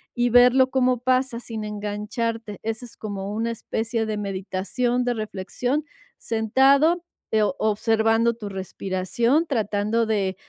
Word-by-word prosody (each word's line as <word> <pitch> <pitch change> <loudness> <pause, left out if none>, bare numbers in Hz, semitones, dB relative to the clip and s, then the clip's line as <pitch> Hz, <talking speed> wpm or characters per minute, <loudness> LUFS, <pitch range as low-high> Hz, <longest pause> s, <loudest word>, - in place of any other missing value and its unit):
y 245 0 +2
verlo 250 +2 +6
como 255 -2 +2
pasa 255 -1 +1
sin 225 -2 -5
engancharte. 210 +1 -4
Esa 225 +2 -3
es 235 - -13
como 200 -2 -5
una 230 +2 -1
especie 225 0 -2
de 215 -1 -3
meditación, 200 +5 -1
de 245 - +1
reflexión, 240 +7 -3 0.3
sentado, 270 +9 +3 0.3
eh, 215 -1 +3
o 275 - 0
observando 225 +2 +2
tu 215 -3 -7
respiración, 195 - 0
tratando 215 -2 0
de, 195 -4 0
225 Hz, 130 wpm, -24 LUFS, 210-245 Hz, 0.3 s, verlo